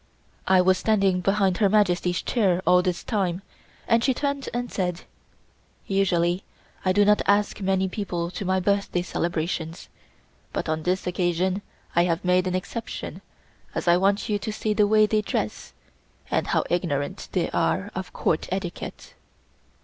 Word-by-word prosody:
I 185 Hz, -1 st, +6 dB
was 185 Hz, 0 st, +3 dB
standing 195 Hz, -4 st, +2 dB
behind 195 Hz, -1 st, +2 dB
Her 205 Hz, -3 st, +3 dB
Majesty's 180 Hz, -4 st, +2 dB
chair 190 Hz, -6 st, +1 dB
all 180 Hz, +1 st, +5 dB
this 180 Hz, -1 st, -2 dB
time, 195 Hz, -4 st, -1 dB, 0.4 s
and 230 Hz, -1 st, +3 dB
she 260 Hz, -1 st, +2 dB
turned 280 Hz, 0 st, -2 dB
and 245 Hz, 0 st, -3 dB
said: 180 Hz, -3 st, -2 dB, 0.8 s
"Usually 185 Hz, -2 st, +1 dB, 0.4 s
I 185 Hz, -, +2 dB
do 205 Hz, +2 st, +4 dB
not 210 Hz, 0 st, +4 dB
ask 205 Hz, 0 st, +2 dB
many 190 Hz, 0 st, +1 dB
people 180 Hz, -3 st, -3 dB
to 185 Hz, -, -5 dB
my 190 Hz, 0 st, +1 dB
birthday 195 Hz, -2 st, 0 dB
celebrations, 165 Hz, -1 st, -3 dB, 0.6 s
but -, -, -2 dB
on 155 Hz, 0 st, -1 dB
this 180 Hz, +3 st, -1 dB
occasion 180 Hz, +2 st, 0 dB, 0.3 s
I 170 Hz, +1 st, +5 dB
have 170 Hz, 0 st, -1 dB
made 180 Hz, +1 st, +3 dB
an 185 Hz, -, -1 dB
exception 210 Hz, +5 st, -5 dB, 0.5 s
as -, -, -3 dB
I 170 Hz, -, +6 dB
want 195 Hz, +2 st, +1 dB
you 210 Hz, -1 st, 0 dB
to 215 Hz, -, -4 dB
see 215 Hz, 0 st, -1 dB
the 210 Hz, 0 st, +3 dB
way 215 Hz, 0 st, +5 dB
they 215 Hz, 0 st, +1 dB
dress 105 Hz, -, -3 dB, 0.6 s
and -, -, +1 dB
how -, -, +2 dB
ignorant 175 Hz, 0 st, -2 dB
they 180 Hz, -3 st, 0 dB
are 200 Hz, +2 st, 0 dB
of 185 Hz, 0 st, -5 dB
Court 160 Hz, -, -1 dB
etiquette." 185 Hz, -2 st, -5 dB
185 Hz, 160 wpm, -25 LUFS, 175-205 Hz, 0.8 s, I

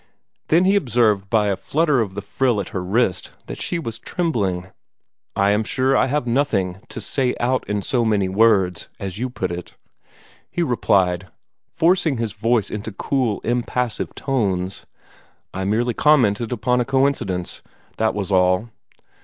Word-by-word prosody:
Then 170 Hz, +4 st, +4 dB
he 195 Hz, +2 st, +4 dB
observed 115 Hz, -, +2 dB
by 110 Hz, -1 st, +3 dB
a 100 Hz, -1 st, +1 dB
flutter 150 Hz, -, +1 dB
of 100 Hz, -4 st, -3 dB
the 100 Hz, -, -5 dB
frill 120 Hz, +2 st, 0 dB
at 100 Hz, -, -4 dB
her 90 Hz, -, -4 dB
wrist 95 Hz, -2 st, 0 dB
that -, -, -7 dB
she 175 Hz, -, -1 dB
was 115 Hz, -9 st, -5 dB
trembling. 100 Hz, -, -2 dB, 0.6 s
"I 100 Hz, +1 st, +3 dB
am 105 Hz, +2 st, +2 dB
sure 130 Hz, +4 st, +1 dB
I -, -, +3 dB
have 145 Hz, 0 st, -1 dB
nothing 115 Hz, -8 st, 0 dB
to -, -, -6 dB
'say 130 Hz, -3 st, 0 dB
out 125 Hz, +2 st, +1 dB
in 105 Hz, -1 st, -1 dB
so 125 Hz, -3 st, +1 dB
many 105 Hz, -4 st, +1 dB
words,' 95 Hz, -3 st, +2 dB
as 95 Hz, 0 st, -5 dB
you 130 Hz, +2 st, -2 dB
put 95 Hz, -7 st, -3 dB
it," 90 Hz, 0 st, -7 dB, 0.7 s
he 175 Hz, -, -1 dB
replied, 95 Hz, -, +1 dB, 0.4 s
forcing 165 Hz, -4 st, +2 dB
his 115 Hz, -2 st, -2 dB
voice 115 Hz, -1 st, 0 dB
into 105 Hz, +1 st, -5 dB
cool, 120 Hz, +1 st, -1 dB
impassive 120 Hz, 0 st, -2 dB
tones. 95 Hz, -9 st, -2 dB, 0.7 s
"I 95 Hz, +1 st, -3 dB
merely 115 Hz, +4 st, +1 dB
commented 120 Hz, -6 st, +3 dB
upon 125 Hz, +1 st, +1 dB
a -, -, -1 dB
coincidence, 130 Hz, -10 st, 0 dB, 0.4 s
that 110 Hz, -1 st, +1 dB
was 100 Hz, -1 st, -3 dB
all. 90 Hz, +4 st, +3 dB
110 Hz, 160 wpm, -21 LUFS, 95-130 Hz, 0.7 s, Then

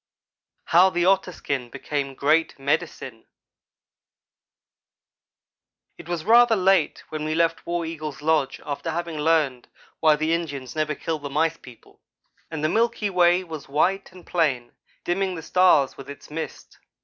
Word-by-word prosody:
HOW 180 Hz, +3 st, +6 dB
THE 175 Hz, -2 st, 0 dB
OTTER 190 Hz, -1 st, +2 dB
SKIN 135 Hz, -7 st, -4 dB
BECAME 140 Hz, +1 st, -4 dB
GREAT 155 Hz, +4 st, +1 dB
"MEDICINE" 135 Hz, -4 st, -3 dB, 2.7 s
IT 170 Hz, -, -11 dB
was 170 Hz, -3 st, -3 dB
rather 235 Hz, +1 st, +6 dB
late 190 Hz, -4 st, +2 dB
when 155 Hz, -1 st, -4 dB
we 155 Hz, 0 st, -2 dB
left 165 Hz, 0 st, 0 dB
War 170 Hz, -1 st, -1 dB
Eagle's 155 Hz, -2 st, -6 dB
lodge 155 Hz, -3 st, +1 dB
after 145 Hz, +3 st, -4 dB
having 165 Hz, -1 st, -4 dB
learned 150 Hz, -5 st, +1 dB, 0.3 s
why 155 Hz, -1 st, +5 dB
the 155 Hz, +2 st, 0 dB
Indians 145 Hz, -6 st, -4 dB
never 155 Hz, -1 st, -1 dB
kill 160 Hz, +1 st, -3 dB
the 145 Hz, -1 st, -6 dB
Mice 160 Hz, +3 st, 0 dB
people; 120 Hz, -3 st, -17 dB, 0.5 s
and 160 Hz, -2 st, -5 dB
the -, -, +3 dB
milky 225 Hz, +2 st, 0 dB
way 180 Hz, 0 st, +4 dB
was 160 Hz, -6 st, -9 dB
white 190 Hz, +8 st, 0 dB
and 180 Hz, -1 st, -15 dB
plain, 135 Hz, -8 st, 0 dB, 0.3 s
dimming 185 Hz, +1 st, -1 dB
the 160 Hz, -, -7 dB
stars 180 Hz, -7 st, +3 dB
with 135 Hz, 0 st, -10 dB
its 140 Hz, +1 st, -11 dB
mist. 160 Hz, +1 st, -7 dB
160 Hz, 150 wpm, -24 LUFS, 145-175 Hz, 2.7 s, HOW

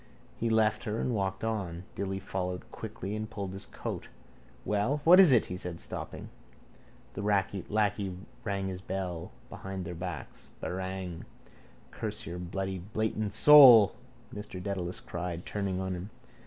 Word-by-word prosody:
He 115 Hz, -, -1 dB
left 110 Hz, -1 st, +2 dB
her 105 Hz, 0 st, -2 dB
and 125 Hz, -, 0 dB
walked 95 Hz, -2 st, -2 dB
on. 95 Hz, -6 st, -2 dB
Dilly 95 Hz, 0 st, -3 dB
followed 90 Hz, -1 st, -4 dB
quickly 100 Hz, +3 st, -6 dB
and 110 Hz, 0 st, -4 dB
pulled 100 Hz, -4 st, -5 dB
his 95 Hz, -, -7 dB
coat. -, -, -6 dB, 0.6 s
—Well, 105 Hz, +8 st, +1 dB
what 180 Hz, +4 st, +8 dB
is 185 Hz, -6 st, +10 dB
it? 120 Hz, -4 st, +5 dB
he 90 Hz, -, -5 dB
said, 90 Hz, -2 st, -5 dB
stopping. -, -, -6 dB, 0.8 s
The 100 Hz, -, -5 dB
lacquey 100 Hz, 0 st, 0 dB, 0.3 s
rang 100 Hz, -3 st, -2 dB
his 95 Hz, -1 st, -5 dB
bell 90 Hz, -3 st, -4 dB, 0.2 s
behind 95 Hz, -1 st, -6 dB
their 85 Hz, -, -5 dB
backs. 85 Hz, -2 st, -7 dB
—Barang! 95 Hz, -2 st, -4 dB, 0.7 s
—Curse -, -, -5 dB
your 85 Hz, +2 st, -5 dB
bloody 95 Hz, +1 st, -3 dB
blatant 110 Hz, +2 st, -2 dB
soul, 120 Hz, -3 st, +9 dB, 0.4 s
Mr 105 Hz, -3 st, -6 dB
Dedalus 90 Hz, -2 st, -4 dB
cried, 85 Hz, 0 st, -5 dB
turning 100 Hz, -3 st, -2 dB
on 95 Hz, 0 st, -2 dB
him. 90 Hz, +3 st, -6 dB
95 Hz, 145 wpm, -30 LUFS, 90-105 Hz, 0.8 s, is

